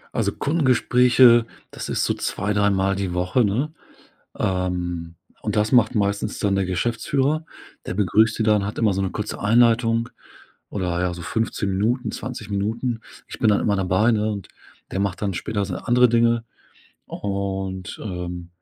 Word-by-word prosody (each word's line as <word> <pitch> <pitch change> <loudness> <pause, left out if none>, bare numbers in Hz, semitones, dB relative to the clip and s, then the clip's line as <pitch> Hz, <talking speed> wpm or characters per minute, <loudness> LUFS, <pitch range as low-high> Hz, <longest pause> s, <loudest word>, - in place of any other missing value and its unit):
Also, - - +1
Kundengespräche, 125 -4 +4 0.3
das - - -7
ist - - 0
so - - +1
zwei, 105 +3 -2
dreimal 100 -1 +2
die 95 -2 -3
Woche, 90 +7 +1
ne? 125 +10 -1 0.6
Ähm, 90 -2 -2 0.3
und - - -2
das 105 +1 +1
macht 120 -3 +4
meistens 100 -2 -1
dann 100 -1 +1
der 95 -1 +1
Geschäftsführer, 130 - 0 0.4
der - - -3
begrüßt 105 +3 +2
die - - +1
dann, 105 -2 +3
hat 105 - -5
immer 110 -4 +3
so 95 +1 -1
'ne 95 - -2
kurze 105 0 -4
Einleitung, 115 +1 +3 0.6
oder 90 -3 -2
ja, 90 -1 -1
so 85 - -8
15 105 +2 -2
Minuten, 110 +7 0
20 120 -5 -6
Minuten. 115 +4 -2 0.3
Ich - - -9
bin 115 - +2
dann 105 - +3
immer 105 - +2
dabei, 95 +5 +2
ne? 110 0 +1
Und 100 -4 -6 0.4
der 95 - -2
macht 100 -1 -2
dann 100 -2 0
später 100 +4 -2
seine 95 -2 -6
andere 125 0 +5
Dinge. 115 0 +2 0.6
Und, 95 -2 -4
ähm, 90 -3 -5
105 Hz, 165 wpm, -23 LUFS, 95-115 Hz, 0.6 s, andere